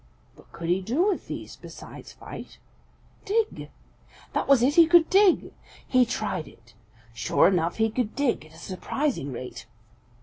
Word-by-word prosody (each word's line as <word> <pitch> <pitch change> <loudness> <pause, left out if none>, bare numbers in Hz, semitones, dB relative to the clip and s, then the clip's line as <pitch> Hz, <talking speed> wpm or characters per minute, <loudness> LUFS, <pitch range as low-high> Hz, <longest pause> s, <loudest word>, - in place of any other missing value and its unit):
What - - -21
could 170 - -7
he 180 +2 +2
do 280 - +1
with 390 - -3
these - - -7
besides - - -11
fight? - - -10 0.7
Dig! 435 +1 -1 0.6
That - - -1
was 275 -4 +5
it; 270 +3 +3
he 330 0 +7
could 340 -1 +5
dig. 390 -1 +4 0.3
He 255 -2 +4
tried 215 -9 -3
it. 115 0 -18 0.4
Sure 115 - +3
enough, 175 -3 +1
he 220 0 +1
could 230 -1 -2
dig 280 - 0
at 155 - -20
a - - -15
surprising 190 - -3
rate. 125 -2 -8
245 Hz, 160 wpm, -26 LUFS, -, 0.7 s, he